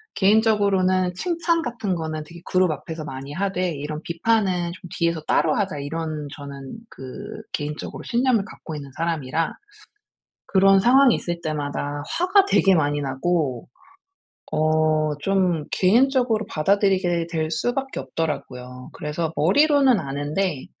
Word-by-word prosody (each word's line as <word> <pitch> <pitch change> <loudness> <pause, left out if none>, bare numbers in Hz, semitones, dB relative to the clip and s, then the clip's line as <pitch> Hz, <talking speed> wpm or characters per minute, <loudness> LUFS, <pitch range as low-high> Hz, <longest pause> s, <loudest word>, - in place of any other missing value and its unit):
개인적으로는 195 -3 +3
'칭찬 335 - 0
같은 225 - -2
거는 155 -2 -4
되게 170 +2 -12
그룹 185 -2 +2
앞에서 155 +2 -6
많이 135 +1 -7
하되 185 0 -1
이런 150 +1 -5
비판은 180 -1 0
좀 180 -1 -12
뒤에서 170 -3 0
따로 155 -2 +3
하자.' 195 -7 -1
이런 155 0 -4
저는 140 +4 -9
그 130 -1 -9
개인적으로 150 +1 -5
신념을 240 -4 +1
갖고 165 -6 -9
있는 140 -2 -8
사람이라 165 -1 -1 0.9
그런 195 0 +5
상황이 250 +3 +6
있을 170 -1 -4
때마다 145 -1 -3
화가 370 +3 +3
되게 195 - +4
많이 145 -2 +1
나고 135 -2 -1 0.9
어 155 0 +2 0.2
좀 185 -5 +1
개인적으로 240 +2 +3
받아들이게 185 -1 +1
될 160 -1 -1
수밖에 265 - -2
없더라고요. 125 -5 -5
그래서 160 0 -3
머리로는 270 - +4
아는데 145 +3 -2
170 Hz, 305 characters per minute, -23 LUFS, 150-200 Hz, 0.9 s, 상황이